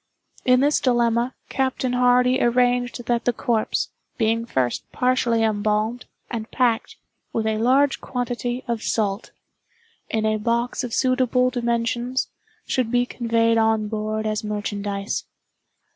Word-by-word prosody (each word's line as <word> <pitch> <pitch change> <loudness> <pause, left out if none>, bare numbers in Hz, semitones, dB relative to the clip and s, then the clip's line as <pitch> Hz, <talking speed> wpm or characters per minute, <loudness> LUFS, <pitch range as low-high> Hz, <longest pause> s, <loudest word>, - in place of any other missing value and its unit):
In 255 0 +5
this 290 +2 +3
dilemma, 240 0 +1
Captain 260 -1 -1
Hardy 250 +1 +4
arranged 245 0 +1
that 240 0 0
the 245 - +4
corpse, 235 -2 -1 0.3
being 230 0 +1
first 125 - -1
partially 250 -3 +1
embalmed, 215 +2 0 0.3
and 225 -2 -4
packed, 240 -3 0 0.4
with 225 - -1
a 220 0 0
large 270 +4 +3
quantity 245 0 -3
of 235 -2 -2
salt, 205 -2 -1 0.8
in 220 -1 0
a 215 0 +1
box 235 +2 0
of 245 - -4
suitable 255 -1 +2
dimensions, 240 +1 -1 0.4
should 255 -3 0
be 245 +1 +2
conveyed 230 -2 +1
on 220 -1 +2
board 215 0 -2
as 215 0 -1
merchandise. 205 -1 -3
235 Hz, 130 wpm, -23 LUFS, 220-250 Hz, 0.8 s, In